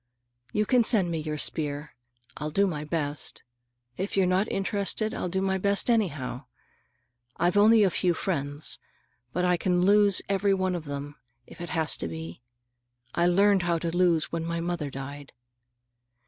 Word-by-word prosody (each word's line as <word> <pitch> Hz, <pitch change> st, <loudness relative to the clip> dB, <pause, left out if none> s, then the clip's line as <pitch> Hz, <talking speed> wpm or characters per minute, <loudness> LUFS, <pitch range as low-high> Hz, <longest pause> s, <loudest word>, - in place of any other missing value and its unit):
You 210 Hz, 0 st, 0 dB
can 245 Hz, +2 st, +3 dB
send 200 Hz, -7 st, +3 dB
me 165 Hz, -, -2 dB
your 155 Hz, 0 st, -4 dB
spear. 150 Hz, 0 st, -3 dB, 0.4 s
I'll 150 Hz, +1 st, -3 dB
do 200 Hz, +6 st, +2 dB
my 155 Hz, -6 st, -3 dB
best. 150 Hz, -2 st, -1 dB, 0.5 s
If 195 Hz, +2 st, -3 dB
you're 190 Hz, -, +4 dB
not 185 Hz, +3 st, +1 dB
interested, 200 Hz, +2 st, -1 dB
I'll 180 Hz, -, -3 dB
do 190 Hz, +2 st, -1 dB
my 190 Hz, 0 st, 0 dB
best 200 Hz, +5 st, +2 dB
anyhow. 150 Hz, -, -1 dB, 0.9 s
I've 175 Hz, +2 st, +1 dB
only 215 Hz, +2 st, +6 dB
a 190 Hz, -, +3 dB
few 175 Hz, -1 st, +2 dB
friends, 145 Hz, -4 st, 0 dB, 0.5 s
but 180 Hz, +5 st, -1 dB
I 180 Hz, -1 st, +2 dB
can 180 Hz, 0 st, +1 dB
lose 205 Hz, -1 st, +5 dB
every 195 Hz, 0 st, +1 dB
one 185 Hz, -1 st, -1 dB
of 170 Hz, -3 st, -5 dB
them, 145 Hz, 0 st, -6 dB, 0.3 s
if 170 Hz, -, -13 dB
it 175 Hz, -, -6 dB
has 160 Hz, -4 st, -1 dB
to -, -, -4 dB
be. 80 Hz, +4 st, -8 dB, 0.7 s
I 170 Hz, 0 st, +2 dB
learned 195 Hz, +2 st, +4 dB
how 170 Hz, -1 st, 0 dB
to 165 Hz, +1 st, -3 dB
lose 175 Hz, -3 st, +2 dB
when 165 Hz, -1 st, -3 dB
my 170 Hz, 0 st, -3 dB
mother 170 Hz, -3 st, -3 dB
died. 140 Hz, +1 st, -8 dB
175 Hz, 170 wpm, -27 LUFS, 150-195 Hz, 0.9 s, only